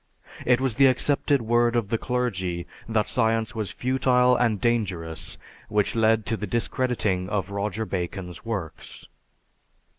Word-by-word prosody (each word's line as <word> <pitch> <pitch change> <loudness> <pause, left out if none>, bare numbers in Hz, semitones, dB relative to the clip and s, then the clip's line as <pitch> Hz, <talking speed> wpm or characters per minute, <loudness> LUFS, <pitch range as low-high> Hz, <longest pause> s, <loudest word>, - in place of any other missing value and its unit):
It 125 0 +5
was 130 -3 0
the 135 +4 +5
accepted 140 +1 +2
word 120 +1 +2
of 115 -4 0
the 115 - +1
clergy 95 -9 -2 0.2
that 110 -2 +1
science 115 -2 +1
was 110 -3 -3
futile 125 -1 +2
and 115 -4 +1
dangerous 90 -8 -2 0.3
which 105 -1 +1
led 110 -1 +3
to 115 - 0
the 105 - -4
discrediting 115 -4 -1
of 100 -2 -2
Roger 105 +2 -2
Bacon's 90 -1 -5
works. 100 -9 -6
110 Hz, 140 wpm, -25 LUFS, 100-125 Hz, 0.3 s, It